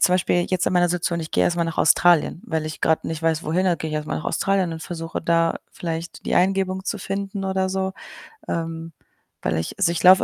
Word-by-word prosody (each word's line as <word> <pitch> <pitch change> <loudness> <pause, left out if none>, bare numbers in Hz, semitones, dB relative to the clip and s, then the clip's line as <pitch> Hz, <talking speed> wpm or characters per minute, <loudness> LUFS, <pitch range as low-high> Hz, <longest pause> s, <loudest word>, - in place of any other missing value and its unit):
Zum 180 - +5
Beispiel, 175 -1 +2
jetzt 185 -2 +1
in - - +2
meiner 175 -1 +4
Situation, 175 0 -1
ich 160 - -6
gehe - - +3
erst 175 - +1
mal 170 - +1
nach 165 -1 -4
Australien, 170 +1 +4
weil 160 -2 -1
ich 155 - -6
grad 160 - +2
nicht 160 -1 -3
weiß, 165 0 +1
wohin, 180 +5 +1
also, 175 -2 +3
gehe 160 - -4
ich - - -3
erst 150 0 -4
mal - - -1
nach - - -5
Australien 195 -3 +1
und 160 - -6
versuche, 165 -2 -5
da 165 0 +2 0.2
vielleicht 165 0 -5
die - - +1
Eingebung 190 0 +1
zu 210 - -2
finden 195 +1 -3
oder 190 0 0
so. 190 0 -1 0.6
Ähm, 165 0 -3 0.5
weil 80 - 0
ich 80 - -4
also, - - +4
ich 170 - -2
laufe 185 +1 +8
170 Hz, 240 wpm, -23 LUFS, 165-190 Hz, 0.6 s, laufe